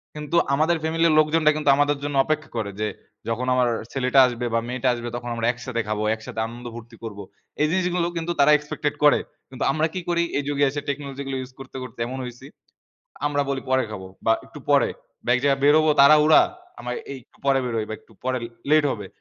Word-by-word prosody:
কিন্তু 150 Hz, +2 st, -4 dB, 0.2 s
আমাদের 160 Hz, +4 st, +2 dB
ফ্যামিলির 165 Hz, 0 st, +2 dB
লোকজনরা 155 Hz, 0 st, +4 dB
কিন্তু 150 Hz, -2 st, +1 dB
আমাদের 145 Hz, 0 st, +2 dB
জন্য 145 Hz, -1 st, -3 dB
অপেক্ষা 155 Hz, 0 st, -2 dB
করে 100 Hz, -2 st, -2 dB
যে, 110 Hz, -, 0 dB, 0.4 s
যখন 115 Hz, +2 st, -1 dB
আমার 125 Hz, -1 st, +3 dB, 0.2 s
ছেলেটা 135 Hz, 0 st, +2 dB
আসবে 120 Hz, 0 st, -4 dB
বা 115 Hz, -, +3 dB
মেয়েটা 130 Hz, +1 st, -2 dB
আসবে 120 Hz, 0 st, -5 dB
তখন 120 Hz, 0 st, -5 dB
আমরা 115 Hz, -, -2 dB
একসাথে 125 Hz, -1 st, -4 dB
খাব, 110 Hz, -, -1 dB, 0.2 s
একসাথে 110 Hz, 0 st, -8 dB
আনন্দফুর্তি 120 Hz, 0 st, -9 dB
করব। 105 Hz, -3 st, -7 dB, 0.4 s
এই 150 Hz, -, +4 dB
জিনিসগুলো 180 Hz, -1 st, +1 dB
কিন্তু 165 Hz, +1 st, -2 dB
তারা 140 Hz, +2 st, +6 dB
এক্সপেক্টেড 150 Hz, 0 st, -2 dB
করে। 145 Hz, -, +6 dB, 0.3 s
কিন্তু 130 Hz, -, -5 dB
আমরা 155 Hz, +3 st, +1 dB
কী 185 Hz, -, -3 dB
করি? 170 Hz, 0 st, +2 dB
এই 145 Hz, -, -1 dB
যুগে 145 Hz, 0 st, +1 dB
এসে 145 Hz, +1 st, -4 dB
টেকনলজিগুলো 140 Hz, -1 st, -4 dB
ইউজ 130 Hz, 0 st, -9 dB
করতে, 135 Hz, 0 st, -9 dB
করতে 125 Hz, -1 st, -11 dB
এমন 130 Hz, +2 st, -5 dB
হইছি, 125 Hz, +1 st, -10 dB, 0.8 s
আমরা 145 Hz, -1 st, +1 dB
বলি 135 Hz, -1 st, -2 dB
পরে 130 Hz, 0 st, +3 dB
খাব 100 Hz, -3 st, -6 dB, 0.2 s
বা 115 Hz, -, +6 dB
একটু -, -, -12 dB
পরে -, -, +5 dB, 0.4 s
বা -, -, -1 dB
এক 125 Hz, -, +1 dB
জায়গায় 140 Hz, -1 st, +2 dB
বের 145 Hz, +1 st, +6 dB
হব 155 Hz, -, +2 dB
তাড়াহুড়া, 150 Hz, +2 st, +7 dB, 0.4 s
আমরা 125 Hz, -, -5 dB, 0.2 s
এই 135 Hz, -, -6 dB
একটু -, -, -29 dB
পরে 135 Hz, -1 st, +4 dB
বের 120 Hz, -2 st, -3 dB
হই 110 Hz, -, -2 dB
বা -, -, -2 dB
একটু -, -, -23 dB
পরে 130 Hz, 0 st, 0 dB, 0.3 s
লেট 155 Hz, 0 st, +5 dB
হবে। 105 Hz, -3 st, -6 dB
135 Hz, 210 wpm, -23 LUFS, 120-150 Hz, 0.8 s, তাড়াহুড়া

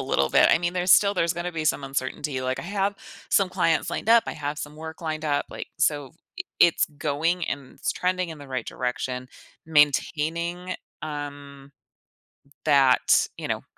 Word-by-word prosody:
little 70 Hz, 0 st, +1 dB
bit, -, -, +5 dB
I -, -, +5 dB
mean, 175 Hz, 0 st, -1 dB
there's 180 Hz, 0 st, +3 dB
still 200 Hz, 0 st, +5 dB
there's 170 Hz, -2 st, +1 dB
gonna 175 Hz, +1 st, -4 dB
be 160 Hz, -2 st, -3 dB
some 145 Hz, -2 st, +1 dB
uncertainty, 135 Hz, +1 st, -3 dB
like, 130 Hz, 0 st, -2 dB
I -, -, -4 dB
have 200 Hz, +2 st, -1 dB, 0.4 s
some 195 Hz, -2 st, +4 dB
clients 180 Hz, -3 st, +1 dB
lined -, -, -4 dB
up, 230 Hz, 0 st, +6 dB
I -, -, -3 dB
have 145 Hz, -1 st, -4 dB
some 150 Hz, +1 st, -7 dB
work 160 Hz, 0 st, -8 dB
lined 155 Hz, -1 st, -4 dB
up, 145 Hz, -2 st, 0 dB
like, -, -, -7 dB
so 145 Hz, -3 st, +1 dB, 0.3 s
i 360 Hz, -, -2 dB, 0.2 s
it's 170 Hz, -1 st, +5 dB
going, 155 Hz, +4 st, -1 dB
and 140 Hz, -2 st, -5 dB
it's -, -, -2 dB
trending 180 Hz, -1 st, -1 dB
in 160 Hz, -, -8 dB
the 145 Hz, -, -11 dB
right 130 Hz, -3 st, -3 dB
direction, 125 Hz, 0 st, -3 dB, 0.4 s
maintaining, 160 Hz, +4 st, +1 dB, 0.3 s
um, 145 Hz, -2 st, -7 dB, 0.9 s
that 135 Hz, -4 st, +4 dB
you -, -, -5 dB
know, -, -, -2 dB
155 Hz, 180 wpm, -25 LUFS, 140-175 Hz, 0.9 s, up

